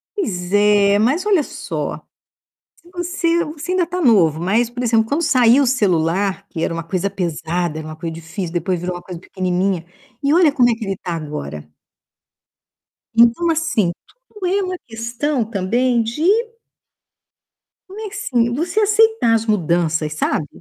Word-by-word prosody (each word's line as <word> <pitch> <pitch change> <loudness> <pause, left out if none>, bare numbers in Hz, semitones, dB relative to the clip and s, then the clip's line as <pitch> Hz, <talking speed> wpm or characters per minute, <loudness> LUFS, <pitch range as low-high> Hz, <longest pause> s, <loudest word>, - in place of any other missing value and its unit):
Pois 180 - -3
é. 205 0 +4
Mas 280 - +1
olha 390 -7 +3
só, - - -5 0.8
se 345 - -22
você 350 -1 0
você 310 +4 -6
ainda 365 -2 +2
tá 360 +1 -3
novo. 180 - +4
Mas, 220 +7 +1
por 245 +1 -5
exemplo, 225 -2 +3
quando 290 +8 0
saiu 255 -2 +4
o - - 0
celular, 195 -3 +1
que 165 -3 -4
era - - -1
uma 165 -1 -4
coisa 185 +3 -2
pesada, 170 -3 -2
era 155 - -7
uma 155 - -7
coisa 165 +1 -5
difícil, 165 +2 -6
depois 180 +1 -1
virou 180 +1 -3
uma 175 - -7
coisa 175 -2 -9
pequenininha, 185 -1 -1 0.4
e 280 +2 +3
olha 335 -3 +5
como 245 -3 +3
é - - +3
que 225 -2 -6
ele 195 -1 -3
tá 175 - -5
agora. 75 - -7 1.4
Então, 235 +9 +4
assim, 315 - +1 0.4
tudo 420 -4 -7
é 395 +2 +1
uma 365 -1 -3
questão 235 +4 -2
também 235 +5 +1
de 230 +7 -3 1.7
mas, 430 +3 -7 0.3
assim, 235 0 +2
você 340 - -1
aceitar 435 - +3
as 225 0 +1
mudanças, 165 -6 0
sabe. 155 -1 -1
220 Hz, 160 wpm, -19 LUFS, 175-295 Hz, 1.7 s, olha